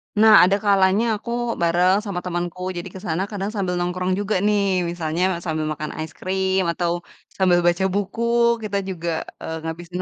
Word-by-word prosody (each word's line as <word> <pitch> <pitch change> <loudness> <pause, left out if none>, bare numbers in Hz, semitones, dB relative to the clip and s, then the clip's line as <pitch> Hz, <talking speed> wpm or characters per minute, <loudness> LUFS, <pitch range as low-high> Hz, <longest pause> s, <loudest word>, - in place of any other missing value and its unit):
Nah 215 +1 +6
adakalanya 200 +1 +3
aku 235 - -7 0.3
bareng 180 +3 +3
sama 195 -4 -3
temenku, 175 0 -3 0.2
jadi 175 - -5
ke 190 - -6
sana 165 +3 0
kadang 200 0 -3
sambil 185 -3 -1
nongkrong 180 +1 -1
juga 205 0 -1
nih, 210 -1 +3 0.3
misalnya 170 0 -2 0.2
sambil 155 -2 -1
makan 155 0 -5
es 160 - -4
krim, 190 0 0
atau 170 0 -1 0.5
sambil 185 -2 +4
baca 175 +2 +2
buku, 205 +3 -2
eee, 235 0 +2
kita 200 -1 -2
juga 170 -2 -4 0.5
ngabisin 175 +2 -5
185 Hz, 160 wpm, -22 LUFS, 175-200 Hz, 0.5 s, Nah